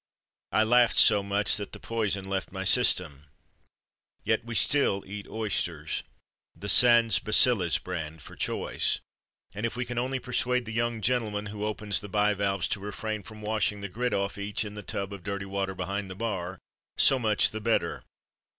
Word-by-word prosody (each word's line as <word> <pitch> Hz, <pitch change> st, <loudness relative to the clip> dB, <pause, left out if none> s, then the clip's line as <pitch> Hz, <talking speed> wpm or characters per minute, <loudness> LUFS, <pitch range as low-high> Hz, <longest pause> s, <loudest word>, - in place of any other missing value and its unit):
I 110 Hz, -, +4 dB
laughed 120 Hz, +2 st, +4 dB
so 105 Hz, -, +6 dB
much 100 Hz, +1 st, +1 dB
that 100 Hz, -1 st, -6 dB
the -, -, -7 dB
poison 105 Hz, -4 st, -1 dB
left 95 Hz, 0 st, -3 dB
my 95 Hz, 0 st, -4 dB
system. 90 Hz, -, +2 dB, 1.0 s
Yet -, -, +1 dB
still 140 Hz, -9 st, +3 dB
we -, -, -18 dB
eat 105 Hz, 0 st, -6 dB
oysters 95 Hz, -8 st, -2 dB, 0.5 s
the 100 Hz, -, -5 dB
Sans 115 Hz, -2 st, +6 dB
Bacilles 105 Hz, -4 st, +3 dB
brand, 80 Hz, -3 st, -6 dB
for -, -, -12 dB
choice. -, -, -1 dB, 0.5 s
And 105 Hz, +2 st, -6 dB
if 115 Hz, -, -1 dB
we 125 Hz, 0 st, -2 dB
can 120 Hz, 0 st, -3 dB
only 130 Hz, +2 st, -1 dB
persuade 125 Hz, 0 st, 0 dB
the 110 Hz, -, -6 dB
young 115 Hz, 0 st, -1 dB
gentleman 105 Hz, -2 st, 0 dB
who 105 Hz, -1 st, -5 dB
opens 105 Hz, -2 st, -1 dB
the 105 Hz, -, -8 dB
bivalves 100 Hz, -2 st, +1 dB
to -, -, -1 dB
refrain 105 Hz, +1 st, -4 dB
from 105 Hz, +2 st, -12 dB
washing 105 Hz, -1 st, 0 dB
the 100 Hz, -, -5 dB
grit 125 Hz, +6 st, -2 dB
off 100 Hz, +1 st, -2 dB
each 100 Hz, +2 st, -2 dB
in 105 Hz, -, -7 dB
the 105 Hz, -, -7 dB
tub 100 Hz, 0 st, -4 dB
of 100 Hz, -, -8 dB
dirty 100 Hz, +1 st, -4 dB
water 95 Hz, 0 st, -3 dB
behind 95 Hz, +2 st, -3 dB
the 95 Hz, -, -7 dB
bar, 95 Hz, -4 st, -3 dB, 0.4 s
so 135 Hz, -, +5 dB
much 110 Hz, -3 st, +3 dB
the 110 Hz, -, -5 dB
better. 115 Hz, +1 st, 0 dB
105 Hz, 180 wpm, -28 LUFS, 95-115 Hz, 1.0 s, so